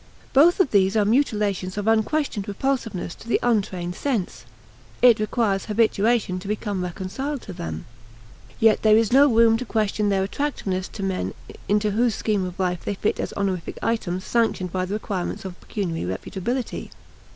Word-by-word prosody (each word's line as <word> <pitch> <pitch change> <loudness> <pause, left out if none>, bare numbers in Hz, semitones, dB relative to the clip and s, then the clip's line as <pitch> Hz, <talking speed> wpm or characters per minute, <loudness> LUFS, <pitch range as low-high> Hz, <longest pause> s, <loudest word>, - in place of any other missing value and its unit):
Both 325 +8 +6
of 375 - +3
these 195 +1 +3
are 210 - +3
mutilations 210 -6 0
of 205 - -2
unquestioned 225 0 +1
repulsiveness 215 -5 -2
to - - -13
the - - +2
untrained 195 -7 0
sense. 225 -3 -3 0.6
It 240 -3 +7
requires 215 -2 0
habituation 215 -2 +1
to 185 - -9
become 205 -2 -2
reconciled 210 - -4
to 190 - -8
them. 80 - -6 0.7
Yet 220 -1 +4
there 215 -1 +6
is 225 0 +2
no 280 +1 +6
room 225 0 +5
to 250 - -4
question 215 -2 0
their 195 -1 +2
attractiveness 195 -5 -2
to 200 - -7
men 190 -1 -2 0.3
into 210 +1 +2
whose 230 +1 +2
scheme 205 -4 0
of 180 -1 -7
life 180 -2 -1
they 205 - -2
fit 205 - -1
as - - -2
honorific 190 -4 -2
items 185 -5 -1
sanctioned 220 -6 0
by 185 0 -1
the 195 +3 -3
requirements 195 -3 -4
of 185 -1 -8
pecuniary 165 - -3
reputability. 240 - -4
210 Hz, 165 wpm, -23 LUFS, 185-230 Hz, 0.7 s, It